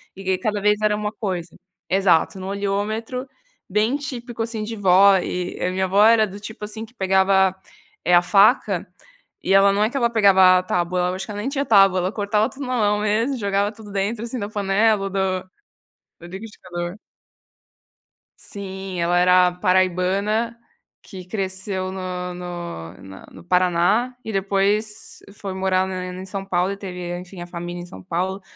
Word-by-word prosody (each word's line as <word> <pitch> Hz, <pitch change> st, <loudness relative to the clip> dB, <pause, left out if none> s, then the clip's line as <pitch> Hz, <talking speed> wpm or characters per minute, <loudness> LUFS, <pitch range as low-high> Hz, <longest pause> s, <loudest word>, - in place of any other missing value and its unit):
e 190 Hz, -1 st, -1 dB
cada 210 Hz, +2 st, -2 dB
vez 210 Hz, +1 st, +2 dB
era 210 Hz, 0 st, +2 dB
uma 210 Hz, 0 st, -3 dB
coisa 185 Hz, -5 st, -4 dB, 0.3 s
exato, 190 Hz, -1 st, +2 dB
no 185 Hz, -, -6 dB
olhômetro, 210 Hz, +6 st, -3 dB, 0.4 s
bem 215 Hz, +7 st, +1 dB
típico 240 Hz, -5 st, -5 dB
assim 225 Hz, -2 st, -4 dB
de 225 Hz, +1 st, -5 dB
vó 195 Hz, -1 st, +5 dB
e 180 Hz, 0 st, -3 dB
a 180 Hz, -, 0 dB
minha 190 Hz, +1 st, 0 dB
avó 195 Hz, +3 st, +4 dB
era 225 Hz, -1 st, +6 dB
do 200 Hz, +2 st, -9 dB
tipo 210 Hz, 0 st, -8 dB
assim 220 Hz, +1 st, -6 dB
que 225 Hz, -, -21 dB
pegava, 190 Hz, -2 st, +3 dB, 0.5 s
eh, 180 Hz, -, +2 dB
a 175 Hz, -, +7 dB
faca 205 Hz, +7 st, +3 dB, 0.6 s
e 195 Hz, -, +1 dB
ela 195 Hz, 0 st, +6 dB
não 205 Hz, +1 st, +2 dB
é 215 Hz, -, +2 dB
que 275 Hz, -, -13 dB
ela 235 Hz, -3 st, +2 dB
pegava 190 Hz, -4 st, +6 dB
a -, -, -5 dB
tábua 180 Hz, 0 st, -1 dB
eu -, -, -2 dB
acho 190 Hz, -, -5 dB
que 210 Hz, -, -8 dB
ela 205 Hz, -, -5 dB
nem 250 Hz, +6 st, -2 dB
tinha 280 Hz, 0 st, -2 dB
tábua 195 Hz, -3 st, +5 dB
ela 185 Hz, +2 st, -1 dB
cortava 210 Hz, +2 st, 0 dB
tudo 275 Hz, 0 st, -8 dB
na 255 Hz, -, -2 dB
mão 210 Hz, -1 st, +2 dB
mesmo 225 Hz, +6 st, 0 dB
jogava 200 Hz, -1 st, 0 dB
tudo 215 Hz, -2 st, -13 dB
dentro, 205 Hz, +3 st, -2 dB
assim, 240 Hz, +1 st, -5 dB
da 205 Hz, 0 st, -4 dB
panela 205 Hz, +1 st, +2 dB
ou 195 Hz, -, -2 dB
do 190 Hz, -1 st, -2 dB, 0.7 s
do 175 Hz, -, -10 dB
liquidificador. 180 Hz, -3 st, -7 dB, 1.5 s
Sim, 190 Hz, -2 st, -7 dB
ela 175 Hz, +1 st, +2 dB
era 180 Hz, 0 st, +5 dB
paraibana, 185 Hz, +6 st, +1 dB, 0.4 s
que 185 Hz, -2 st, -10 dB
cresceu 190 Hz, 0 st, -3 dB
no 180 Hz, -1 st, -5 dB
no 175 Hz, -, -7 dB
na 95 Hz, 0 st, -12 dB
no -, -, -14 dB
Paraná 180 Hz, +7 st, +2 dB
e 220 Hz, -, -5 dB
depois 205 Hz, +2 st, -1 dB, 0.2 s
foi 195 Hz, -2 st, -6 dB
morar 190 Hz, 0 st, +1 dB
na 185 Hz, -1 st, -4 dB
em 185 Hz, +1 st, -7 dB
São 195 Hz, 0 st, -5 dB
Paulo 185 Hz, 0 st, 0 dB
e 200 Hz, -, -5 dB
teve 180 Hz, -3 st, -6 dB
enfim 180 Hz, 0 st, -10 dB
a -, -, -7 dB
família 175 Hz, 0 st, -6 dB
em 175 Hz, -, -9 dB
São 95 Hz, -, -12 dB
Paulo, 185 Hz, -, -2 dB
195 Hz, 180 wpm, -22 LUFS, 185-210 Hz, 1.5 s, a